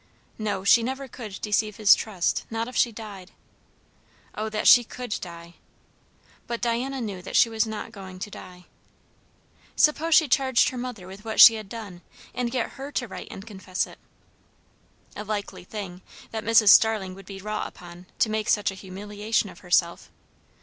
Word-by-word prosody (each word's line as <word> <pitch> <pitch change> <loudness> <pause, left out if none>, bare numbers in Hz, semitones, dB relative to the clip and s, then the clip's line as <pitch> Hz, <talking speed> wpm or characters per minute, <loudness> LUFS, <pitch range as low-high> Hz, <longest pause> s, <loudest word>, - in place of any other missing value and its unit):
No, 205 -3 -2
she 215 +4 +6
never 265 +3 -4
could 215 -5 -9
deceive 210 0 0
his 210 -1 +7
trust, 195 -6 -1
not 225 0 -3
if 250 - -9
she 240 - +3
died. 205 -4 -10 1.0
O 215 +1 -3
that 215 0 -1
she 245 - +9
could 245 -1 -5
die! 170 -1 -9 0.9
But 235 -1 -3
Diana 250 +3 -1
knew 205 -6 -5
that 180 - -7
she 230 - +6
was 225 0 0
not 220 +1 -6
going 190 -4 -10
to 205 +3 -7
die. 180 -1 -12 1.1
Suppose 310 +2 +3
she 315 -2 +5
charged 260 -1 +3
her 255 - -7
mother 245 -7 -6
with 190 +3 -11
what 220 -1 -4
she 230 - +11
had 215 -3 -7
done, 200 -6 -8 0.3
and 245 -1 -2
get 245 -1 -2
her 275 +2 -7
to 245 - -2
write 190 - -8
and 195 - -9
confess 190 -4 -3
it? - - -15 1.2
A 210 - -5
likely 210 -3 -5
thing, 190 -3 -7 0.3
that 220 -1 -4
Mrs. 225 -2 +5
Starling 210 -3 +5
would 195 0 -13
be 195 -1 -8
wrought 210 +2 -3
upon 175 +1 -13
to 220 - +2
make 215 +1 -2
such 205 -2 +2
a 190 - -11
humiliation 205 +3 -3
of - - -15
herself! 175 -1 0
215 Hz, 175 wpm, -25 LUFS, 190-230 Hz, 1.2 s, she